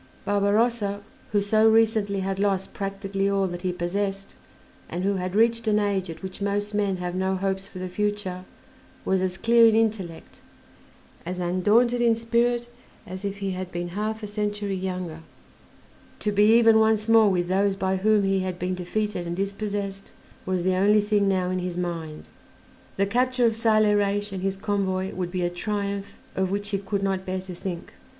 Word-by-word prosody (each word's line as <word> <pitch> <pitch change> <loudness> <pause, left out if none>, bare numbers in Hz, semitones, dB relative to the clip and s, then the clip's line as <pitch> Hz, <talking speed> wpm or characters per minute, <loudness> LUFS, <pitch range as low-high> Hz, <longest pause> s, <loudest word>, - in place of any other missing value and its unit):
Barbarossa, 205 +1 +1 0.3
who 205 -1 +2
so 215 +2 +4
recently 220 -3 +2
had 195 0 -2
lost 195 -2 0
practically 195 0 -2
all 195 -1 +1
that 175 -1 -5
he 185 -1 -1
possessed, 195 +3 -3 0.5
and 180 - -3
who 200 0 +1
had 185 +1 -3
reached 230 +1 +3
an 210 -1 +3
age 200 -3 0
at 165 +3 -8
which 190 +1 -7
most 205 +1 -1
men 200 -2 0
have 180 0 -4
no 190 +1 0
hopes 190 0 -2
for 185 - -11
the 185 0 -4
future, 205 -1 -2 0.6
was 190 -1 +1
as 185 0 -1
clear 230 +1 +5
in 220 - +4
intellect, 210 -7 -2 0.8
as 180 +2 -5
undaunted 210 +8 +2
in 230 -1 +4
spirit, 235 +1 +1 0.4
as 185 +2 -7
if 200 0 -3
he 195 -1 -3
had 185 0 -5
been 175 0 -4
half 215 +4 -3
a - - -3
century 205 -1 -2
younger: 185 -3 -4 1.0
to 210 - -1
be 210 +1 +4
even 225 -1 +6
once 220 -1 +2
more 225 -2 +6
with 175 -2 0
those 195 +2 +2
by 190 0 0
whom 210 +1 +3
he 195 0 +2
had 185 -1 -3
been 180 +1 -2
defeated 185 0 -2
and 170 - -3
dispossessed 200 0 -4 0.4
was 185 -2 0
the 185 +1 +2
only 205 +3 +4
thing 205 -1 +1
now 185 -2 +1
in 185 - -1
his 180 -1 -4
mind. 165 -3 -4 0.7
The 200 - +3
capture 250 +3 +1
of 225 -1 +2
Saleh 215 -2 +3
Reis 205 0 0
and 190 -1 -5
his 195 0 -1
convoy 195 -2 -1
would 180 -2 -3
be 180 0 -2
a 175 - 0
triumph 200 +2 -3 0.2
of 190 -1 0
which 205 +1 -2
he 200 -2 -1
could 195 0 -3
not 190 -1 0
bear 185 0 -3
to 185 -1 -8
think. 175 -1 -6
195 Hz, 185 wpm, -25 LUFS, 185-210 Hz, 1.0 s, even